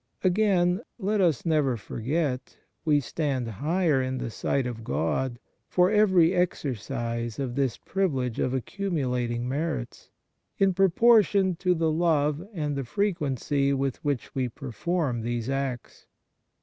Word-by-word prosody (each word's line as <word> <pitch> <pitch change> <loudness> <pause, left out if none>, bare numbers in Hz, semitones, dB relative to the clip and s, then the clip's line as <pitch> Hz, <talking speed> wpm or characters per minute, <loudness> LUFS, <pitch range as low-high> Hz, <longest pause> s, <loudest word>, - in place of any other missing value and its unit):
Again, 185 -1 +3 0.2
let 210 -1 0
us 165 -7 +2
never 150 -7 +2
forget, 130 +5 -3 0.3
we 150 -2 +3
stand 135 -1 -2
higher 150 - +1
in 130 0 -2
the 120 -2 -4
sight 135 +4 -1
of 115 -2 -5
God, 80 - -1 0.3
for 180 +2 +3
every 190 -5 +4
exercise 120 - -2
of 130 -3 -3
this 135 -2 0
privilege 135 -12 -1
of 130 - +1
accumulating 125 - -2
merits, 140 -2 -3 0.5
in 195 -1 +3
pro 195 +1 +4
portion 200 -2 +4
to 180 0 +2
the 160 -1 +1
love 155 -2 +1
and 150 -7 -2
the 140 - -2
frequency 145 - 0
with 135 -2 -2
which 145 -5 -2
we 130 -3 -1
perform 135 +2 -2
these 120 +1 -3
acts. 135 -3 -4
145 Hz, 135 wpm, -27 LUFS, 125-180 Hz, 0.5 s, every